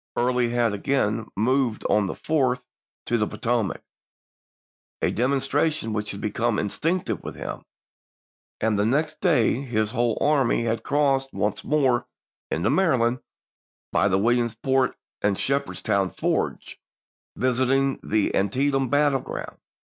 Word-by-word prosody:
Early 125 Hz, 0 st, +1 dB
had 120 Hz, -2 st, +1 dB
again 110 Hz, 0 st, 0 dB
moved 125 Hz, +2 st, +1 dB
on 105 Hz, -2 st, +2 dB
the -, -, -4 dB
4th 130 Hz, -5 st, 0 dB, 0.4 s
to 120 Hz, -, +1 dB
the 105 Hz, -, +1 dB
Potomac 115 Hz, -4 st, -1 dB, 0.5 s
— -, -, -82 dB
a -, -, +3 dB
demonstra 135 Hz, +5 st, +1 dB
Aug.,i864. 160 Hz, -, 0 dB
tion 110 Hz, -5 st, -3 dB
which 105 Hz, -1 st, -2 dB
had 100 Hz, -, -6 dB
become 115 Hz, +1 st, 0 dB
instinctive 165 Hz, -, -1 dB
with -, -, -6 dB
him -, -, -6 dB, 0.5 s
— -, -, -89 dB
and 110 Hz, -2 st, +1 dB
the 105 Hz, -, +2 dB
next 150 Hz, +6 st, 0 dB
day 160 Hz, -, +3 dB
his 110 Hz, -5 st, -1 dB
whole 120 Hz, -2 st, 0 dB
army 140 Hz, -5 st, +2 dB
had 115 Hz, -1 st, -1 dB
crossed 135 Hz, 0 st, +1 dB
once 105 Hz, +1 st, -1 dB
more 135 Hz, -4 st, +2 dB, 0.4 s
into 85 Hz, +9 st, 0 dB
Maryland 130 Hz, -8 st, +2 dB, 0.7 s
by -, -, +3 dB
the 95 Hz, -1 st, +2 dB
Williamsport 120 Hz, +4 st, +1 dB, 0.3 s
and 100 Hz, -2 st, +1 dB
Shepherds 140 Hz, +1 st, -1 dB
town 100 Hz, -2 st, +1 dB
fords, -, -, -2 dB, 0.6 s
visiting 130 Hz, +2 st, +1 dB
the 110 Hz, -1 st, 0 dB
Antietam 135 Hz, +6 st, +1 dB
battleground. 145 Hz, 0 st, 0 dB
120 Hz, 140 wpm, -24 LUFS, 110-135 Hz, 0.7 s, a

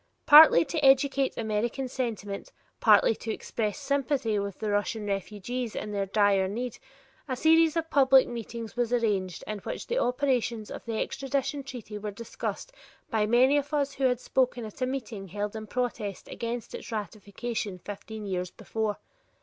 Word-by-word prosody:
Partly 315 Hz, +2 st, +9 dB
to 315 Hz, -3 st, -3 dB
educate 270 Hz, 0 st, +4 dB
American 230 Hz, +4 st, -1 dB
sentiment, 220 Hz, -6 st, -4 dB, 0.3 s
partly -, -, +6 dB
to 225 Hz, -, -4 dB
express 215 Hz, -1 st, -3 dB
sympathy 275 Hz, -6 st, 0 dB
with 200 Hz, -1 st, -4 dB
the 215 Hz, -1 st, -2 dB
Russian 205 Hz, +1 st, -1 dB
refugees 210 Hz, +4 st, -3 dB
in 210 Hz, -, -4 dB
their 200 Hz, -1 st, -1 dB
dire 200 Hz, -1 st, +3 dB
need, 240 Hz, +4 st, -4 dB, 0.5 s
a 260 Hz, -, -2 dB
series 320 Hz, +3 st, +4 dB
of 325 Hz, 0 st, -2 dB
public 265 Hz, -2 st, +6 dB
meetings 230 Hz, -1 st, -6 dB
was 240 Hz, -1 st, 0 dB
arranged 205 Hz, -7 st, 0 dB
in 215 Hz, -1 st, -4 dB
which -, -, -6 dB
the -, -, 0 dB
operations 245 Hz, -, 0 dB
of -, -, -7 dB
the 225 Hz, -2 st, -3 dB
extradition 275 Hz, +1 st, -2 dB
treaty 240 Hz, -6 st, -8 dB
were 210 Hz, 0 st, -4 dB
discussed 230 Hz, -, -5 dB, 0.4 s
by 215 Hz, -2 st, +2 dB
many 255 Hz, +5 st, +5 dB
of 290 Hz, +1 st, -1 dB
us 285 Hz, -1 st, 0 dB
who 275 Hz, -, -1 dB
had 250 Hz, -2 st, +2 dB
spoken 250 Hz, -2 st, 0 dB
at 215 Hz, +4 st, -11 dB
a 255 Hz, -, +2 dB
meeting 230 Hz, -7 st, -5 dB
held 205 Hz, +3 st, -4 dB
in 215 Hz, -1 st, -6 dB
protest 220 Hz, -5 st, -3 dB
against 235 Hz, 0 st, -5 dB
its -, -, -7 dB
ratification 210 Hz, 0 st, -4 dB
fifteen 205 Hz, +3 st, -8 dB
years 180 Hz, -2 st, -2 dB
before. 220 Hz, +2 st, -3 dB
230 Hz, 165 wpm, -28 LUFS, 210-265 Hz, 0.5 s, Partly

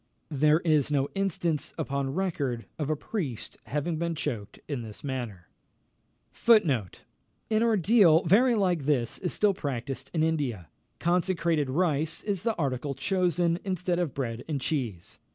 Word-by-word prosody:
There 150 Hz, +3 st, +3 dB
is 155 Hz, -5 st, +2 dB
no 140 Hz, -2 st, +1 dB
instance 170 Hz, -6 st, -1 dB
upon 140 Hz, 0 st, -2 dB
record 145 Hz, -11 st, -1 dB
of 150 Hz, -1 st, -2 dB
a 155 Hz, -, +2 dB
priest 145 Hz, -, -5 dB
having 150 Hz, +3 st, -2 dB
been 170 Hz, 0 st, -1 dB
choked 115 Hz, -9 st, -4 dB
in 140 Hz, -5 st, -3 dB
this 110 Hz, -2 st, -10 dB
manner. 120 Hz, -10 st, -5 dB, 1.0 s
An 185 Hz, -, +6 dB, 0.7 s
ordeal 215 Hz, -6 st, +5 dB
very 235 Hz, +8 st, +4 dB
like 180 Hz, -8 st, +1 dB
this 130 Hz, -6 st, 0 dB
is 180 Hz, -, -2 dB
still 210 Hz, -1 st, +2 dB
practised 135 Hz, -6 st, -4 dB
in 160 Hz, -2 st, +1 dB
India. 135 Hz, -, -1 dB, 0.3 s
Consecrated 170 Hz, -4 st, +1 dB
rice 160 Hz, +1 st, 0 dB
is 200 Hz, -4 st, -1 dB
the 230 Hz, +1 st, 0 dB
article 140 Hz, -1 st, -2 dB
chosen, 175 Hz, +2 st, +1 dB
instead 180 Hz, -2 st, -1 dB
of 170 Hz, -6 st, -2 dB
bread 120 Hz, -4 st, -3 dB
and 150 Hz, -3 st, -2 dB
cheese. 125 Hz, -, -3 dB
155 Hz, 140 wpm, -28 LUFS, 135-180 Hz, 1.0 s, An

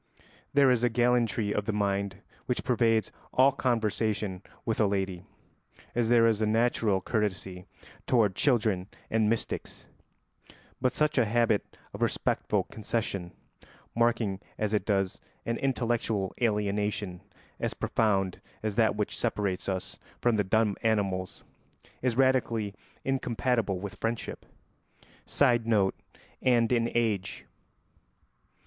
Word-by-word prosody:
There 140 Hz, -2 st, +5 dB
is 120 Hz, -1 st, +2 dB
a 120 Hz, -, +4 dB
gallantry 120 Hz, -3 st, +2 dB
of 105 Hz, -, -1 dB
the 110 Hz, -, 0 dB
mind 100 Hz, -1 st, -1 dB, 0.2 s
which 125 Hz, -, -1 dB
pervades 115 Hz, -3 st, +2 dB, 0.2 s
all 130 Hz, +2 st, +5 dB
conversation 110 Hz, -6 st, -1 dB, 0.2 s
with 115 Hz, -1 st, 0 dB
a 105 Hz, -, +4 dB
lady, 95 Hz, -3 st, -2 dB, 0.7 s
as 115 Hz, -2 st, +1 dB
there 120 Hz, -1 st, +6 dB
is 110 Hz, -2 st, +2 dB
a 110 Hz, -, +2 dB
natural 110 Hz, -3 st, +2 dB
courtesy 95 Hz, -3 st, -2 dB, 0.4 s
toward 110 Hz, -6 st, +3 dB
children 110 Hz, -9 st, +2 dB, 0.2 s
and 110 Hz, -1 st, +3 dB
mystics; 115 Hz, 0 st, -3 dB, 1.0 s
but 130 Hz, 0 st, +2 dB
such 150 Hz, -1 st, +2 dB
a 120 Hz, -, +4 dB
habit 115 Hz, -1 st, +1 dB, 0.2 s
of -, -, -8 dB
respectful -, -, +1 dB
concession, 105 Hz, -5 st, -3 dB, 0.6 s
marking 115 Hz, -4 st, +1 dB, 0.2 s
as 110 Hz, 0 st, -1 dB
it 105 Hz, -, 0 dB
does 95 Hz, -3 st, 0 dB, 0.2 s
an 115 Hz, +1 st, -1 dB
intellectual 115 Hz, -7 st, 0 dB
alienation 105 Hz, -4 st, 0 dB, 0.4 s
as -, -, -2 dB
profound 95 Hz, -4 st, 0 dB, 0.2 s
as 110 Hz, -1 st, -1 dB
that 110 Hz, 0 st, +3 dB
which 105 Hz, -1 st, -2 dB
separates 95 Hz, -2 st, -1 dB
us 95 Hz, -1 st, -4 dB, 0.2 s
from 120 Hz, -2 st, +2 dB
the 105 Hz, -, +2 dB
dumb 105 Hz, +1 st, +2 dB
animals, 100 Hz, -4 st, -1 dB, 0.6 s
is 125 Hz, -2 st, 0 dB
radically 120 Hz, -6 st, +2 dB, 0.3 s
incompatible 125 Hz, -6 st, 0 dB
with 100 Hz, +2 st, -7 dB
friendship. 115 Hz, 0 st, -3 dB, 0.8 s
[Sidenote: 115 Hz, -7 st, +3 dB, 0.5 s
and 120 Hz, -2 st, +3 dB
in 120 Hz, -1 st, +2 dB
age. 110 Hz, -5 st, -1 dB
110 Hz, 120 wpm, -29 LUFS, 100-120 Hz, 1.0 s, there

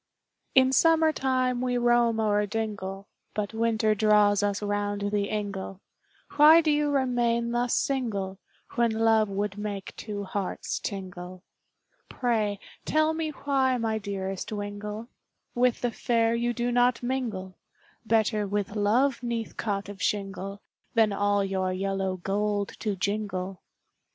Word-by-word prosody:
In 260 Hz, 0 st, +6 dB
summer 320 Hz, +2 st, +5 dB
time 255 Hz, -2 st, 0 dB
we 250 Hz, -1 st, 0 dB
roam 240 Hz, -1 st, +3 dB
o'er 210 Hz, -1 st, +2 dB
dingle, 200 Hz, -3 st, -4 dB, 0.3 s
But 210 Hz, 0 st, -2 dB
winter 220 Hz, -1 st, +2 dB
draws 210 Hz, -1 st, +4 dB
us 205 Hz, -1 st, 0 dB
round 205 Hz, 0 st, -1 dB
the 205 Hz, -1 st, +1 dB
ingle, 200 Hz, -2 st, -4 dB, 0.6 s
Why 305 Hz, +2 st, +9 dB
do 315 Hz, -2 st, +2 dB
you 295 Hz, 0 st, +2 dB
remain 240 Hz, -4 st, +1 dB
thus 240 Hz, 0 st, +1 dB
single, 200 Hz, -8 st, -1 dB, 0.3 s
When 235 Hz, -1 st, +2 dB
love 220 Hz, -1 st, +3 dB
would 200 Hz, +1 st, -3 dB
make 205 Hz, -2 st, -5 dB
two 205 Hz, -2 st, -5 dB
hearts 195 Hz, 0 st, -3 dB
tingle, 185 Hz, -2 st, -6 dB, 0.7 s
Pray, 215 Hz, -5 st, 0 dB, 0.2 s
tell 310 Hz, +1 st, +2 dB
me 320 Hz, -1 st, -2 dB
why 270 Hz, -3 st, +1 dB
my 220 Hz, -2 st, -1 dB
dearest 195 Hz, -2 st, -4 dB
wingle, 210 Hz, +1 st, -5 dB, 0.5 s
With 245 Hz, 0 st, +2 dB
the 245 Hz, -, 0 dB
fair 230 Hz, -1 st, +1 dB
you 235 Hz, +1 st, 0 dB
do 240 Hz, 0 st, -1 dB
not 245 Hz, 0 st, +2 dB
mingle, 230 Hz, -8 st, -3 dB, 0.5 s
Better 220 Hz, -2 st, +1 dB
with 205 Hz, 0 st, -2 dB
love 235 Hz, +6 st, +2 dB
'neath 235 Hz, -2 st, -3 dB
cot 200 Hz, -2 st, -2 dB
of 205 Hz, -1 st, -9 dB
shingle, 195 Hz, -1 st, -3 dB, 0.3 s
Than 220 Hz, -3 st, +4 dB
all 205 Hz, 0 st, +2 dB
your 190 Hz, -1 st, -1 dB
yellow 190 Hz, 0 st, -1 dB
gold 205 Hz, +2 st, -1 dB
to 210 Hz, -3 st, -1 dB
jingle. 195 Hz, -1 st, -3 dB
215 Hz, 135 wpm, -27 LUFS, 200-240 Hz, 0.7 s, Why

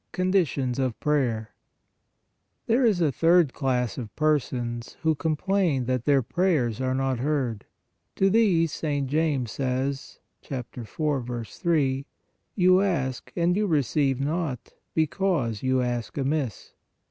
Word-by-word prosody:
CONDITIONS 170 Hz, -9 st, +1 dB
OF 130 Hz, -4 st, -1 dB
PRAYER 120 Hz, -8 st, 0 dB, 1.2 s
There 235 Hz, +3 st, +2 dB
is 210 Hz, -7 st, +3 dB
a 155 Hz, -4 st, +3 dB
third 165 Hz, 0 st, +3 dB
class 125 Hz, -3 st, -1 dB
of 110 Hz, -4 st, -8 dB
persons, 125 Hz, -6 st, -1 dB
who 160 Hz, 0 st, +3 dB
complain 160 Hz, -2 st, 0 dB
that 125 Hz, -1 st, -1 dB
their 140 Hz, -3 st, +3 dB
prayers 130 Hz, -, 0 dB
are 130 Hz, 0 st, 0 dB
not 135 Hz, -2 st, 0 dB
heard. 130 Hz, -6 st, -1 dB, 0.5 s
To 195 Hz, -, +3 dB
these 185 Hz, -8 st, +3 dB
St. 145 Hz, -3 st, -2 dB
James 145 Hz, -5 st, 0 dB
says 135 Hz, +1 st, -2 dB, 0.2 s
(4. 125 Hz, -1 st, -4 dB
3): 140 Hz, -, 0 dB, 0.2 s
" -, -, -49 dB
You 185 Hz, -1 st, +5 dB
ask 130 Hz, -10 st, -1 dB
and 175 Hz, +1 st, +2 dB
you 210 Hz, +1 st, +1 dB
receive 140 Hz, -, +1 dB
not, 145 Hz, -3 st, -3 dB, 0.2 s
because 155 Hz, -, 0 dB
you 130 Hz, 0 st, +1 dB
ask 120 Hz, 0 st, -3 dB
amiss." 140 Hz, -4 st, -2 dB
140 Hz, 125 wpm, -26 LUFS, 125-165 Hz, 1.2 s, You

